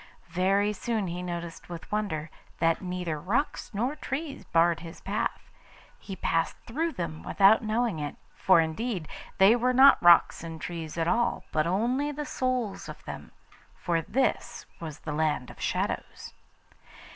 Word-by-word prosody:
Very 195 +4 +2
soon 220 0 -2
he 175 0 -4
noticed 170 -2 -6
with 170 -2 -8
wonder, 160 -8 -2 0.3
that 165 0 +2
neither 180 -4 -3
rocks 210 - -1
nor 245 +7 -1
trees 285 0 -5
barred 170 0 +3
his 165 -1 -10
path. 200 +2 -3 0.5
He 195 - -7
passed 165 -2 0
through 320 +7 -2
them 160 -3 -4
without 200 +2 +5
knowing 220 -4 0
it, 145 -1 -4 0.2
for 185 -3 +4
indeed, 165 +2 -1 0.3
they 195 +4 +7
were 250 +1 +1
not 270 +2 +7
rocks 175 -1 +6
and 165 -1 -7
trees 165 0 -6
at 165 0 0
all, 235 +5 +1
but 155 +1 +1
only 245 +10 0
the 295 +1 -5
souls 255 -6 -2
of - - -10
them; - - -8 0.4
for 170 -2 -1
this 240 +3 -1
was 160 -3 -7
the 155 - -4
Land 150 -4 0
of - - -14
Shadows. - - -3
185 Hz, 155 wpm, -28 LUFS, 165-235 Hz, 0.5 s, they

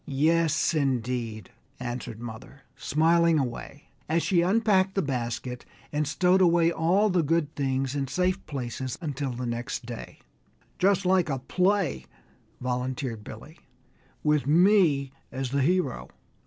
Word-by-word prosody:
"Yes, 155 +2 +2
indeed," 125 - -2 0.3
answered 120 -2 -5
mother, 120 +3 -9
smiling 165 +2 +3
away, 135 +2 -5 0.2
as 165 +1 +2
she 180 -4 +3
unpacked 190 0 +2
the 195 - +1
basket 125 -2 -3 0.3
and 150 0 0
stowed 180 +6 +3
away 170 -2 +4
all 185 +6 +2
the 180 -1 +3
good 155 -1 0
things 135 -1 -1
in 140 -2 -2
safe 185 +5 0
places 130 -3 -4
until 145 -5 -3
the 125 +1 -4
next 120 0 -4
day. 120 -1 -8 0.6
"Just 195 0 +3
like 185 -3 +3
a 135 - 0
play," 180 - 0 0.5
volunteered 125 -2 -3
Billy, - - -11 0.6
"with 150 -2 +2
me 165 -5 +4 0.2
as 130 -1 -4
the 140 0 +1
hero!" 170 -2 0
145 Hz, 130 wpm, -27 LUFS, 125-175 Hz, 0.6 s, away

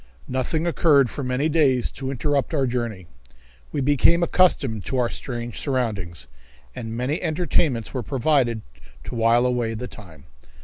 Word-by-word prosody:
Nothing 130 +6 -1
occurred 145 -7 +4
for 140 - -5
many 125 +4 0
days 140 -6 +2
to 135 -1 -5
interrupt 140 +3 0
our 135 -2 +2
journey. 120 -7 -3 0.7
We - - -1
became 145 +5 +3
accustomed 135 - +2
to 130 - -2
our 120 -2 +2
strange 120 -2 -5
surroundings, 100 - -2 0.5
and 115 0 -5
many 130 +6 -1
entertainments 155 -7 0
were 130 - -2
provided 130 -3 +1 0.4
to - - -7
while 115 +1 +3
away 120 -2 0
the 125 +3 -5
time. 80 - -13
125 Hz, 145 wpm, -23 LUFS, 115-145 Hz, 0.7 s, occurred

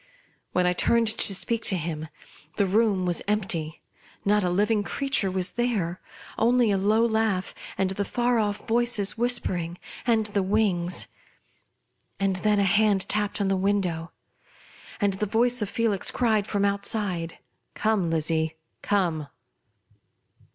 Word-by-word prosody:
When 180 0 +1
I 180 - +3
turned 235 +5 +2
to 215 -2 +4
speak 230 +4 -1
to 190 - +4
him, 160 -1 -4 0.5
the 200 - +2
room 200 -1 +2
was 175 -1 0
empty. 180 -7 -2 0.4
Not 205 0 +3
a 180 - +1
living 205 +4 +1
creature 270 -1 0
was 185 -1 -1
there; 210 -8 -1 0.4
only 240 -1 +3
a 195 - +2
low 215 +4 +3
laugh, 220 -4 0 0.2
and 190 -1 0
the 200 +1 -2
far 240 +3 0
off 205 +1 -2
voices 235 -3 +1
whispering, 190 -8 -1 0.3
and 225 -2 +3
the 205 -1 0
wings. 190 -3 0 1.1
And 195 -1 0
then 210 +2 +1
a 200 - +3
hand 205 0 +3
tapped 210 0 0
on 200 - 0
the 195 - +2
window, 185 -4 -1 0.9
and 200 -3 +1
the 210 +2 -2
voice 240 +3 +1
of 205 - -2
Felix 220 -4 0
cried 220 -4 +1
from 200 -1 0
outside, 200 -4 -2 0.2
" - - -50
Come, 215 -6 +1
Lizzie, 160 0 -1 0.3
come 170 -7 0
200 Hz, 145 wpm, -25 LUFS, 185-220 Hz, 1.1 s, to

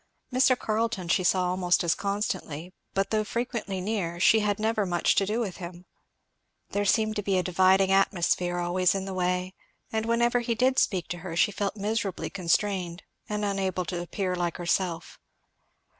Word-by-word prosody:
Mr. 255 0 +4
Carleton 215 -4 -1
she 175 +2 +2
saw 180 +1 +2
almost 180 0 +2
as 170 -1 +3
constantly, 185 -5 -3 0.2
but 195 0 0
though 215 -1 +2
frequently 230 -3 -3
near 185 -4 -2
she 220 +4 +5
had 205 -1 0
never 220 0 0
much 175 -2 +2
to 195 - +1
do 215 +3 0
with 200 -7 -3
him. 175 0 -9 0.9
There 205 0 0
seemed 215 +1 +2
to - - 0
be 195 -2 0
a 180 - +1
dividing 190 +1 +3
atmosphere 180 -2 +2
always 175 +2 +1
in 195 -1 -2
the 195 - -5
way; 180 0 -1 0.4
and 220 0 -1
whenever 235 +1 +2
he 235 -1 -1
did 255 +3 +3
speak 185 -3 0
to 175 - -4
her 175 -1 -6
she 175 - +3
felt 200 0 -3
miserably 200 -6 -2
constrained 180 0 -1 0.3
and 210 0 -1
unable 190 -2 -1
to 175 0 -3
appear 185 +1 -2
like 175 -1 -2
herself. 175 -1 -2
190 Hz, 175 wpm, -27 LUFS, 180-210 Hz, 0.9 s, she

